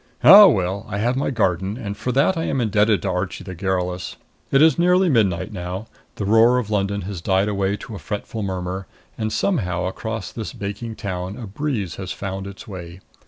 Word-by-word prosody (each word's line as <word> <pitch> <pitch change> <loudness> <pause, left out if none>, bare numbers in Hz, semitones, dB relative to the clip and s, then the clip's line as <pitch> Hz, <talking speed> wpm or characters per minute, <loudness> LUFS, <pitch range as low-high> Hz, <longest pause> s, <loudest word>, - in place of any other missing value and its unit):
Ah, 200 +5 +11
well, 95 - 0
I 100 - -3
have 120 +5 +1
my 135 - 0
garden, 95 -4 0
and 105 -5 -5
for 120 +4 -3
that 140 +9 +3
I 165 0 -2
am 135 - -1
indebted 105 -2 +2
to 100 - -1
Archie 90 +1 -3
the 95 0 -7
garrulous. 90 -1 -2 0.3
It 135 - +4
is 160 +2 +5
nearly 180 +1 +4
midnight 105 - +1
now. 90 +2 -5 0.3
The 100 - -3
roar 115 +4 +5
of 110 -4 -2
London 100 0 0
has 95 -2 -6
died 95 +3 +2
away 100 -1 0
to 110 - -9
a 100 - -6
fretful 110 +2 -5
murmur, 95 -1 -4 0.3
and 110 -1 -2
somehow 90 - 0
across 110 +3 -4
this 110 -2 -6
baking 105 +3 -5
town 95 -2 -5
a 120 - -6
breeze 105 - -3
has 95 -2 -5
found 95 0 -5
its 100 0 -10
way. 90 -2 -9
100 Hz, 200 wpm, -22 LUFS, 95-115 Hz, 0.3 s, Ah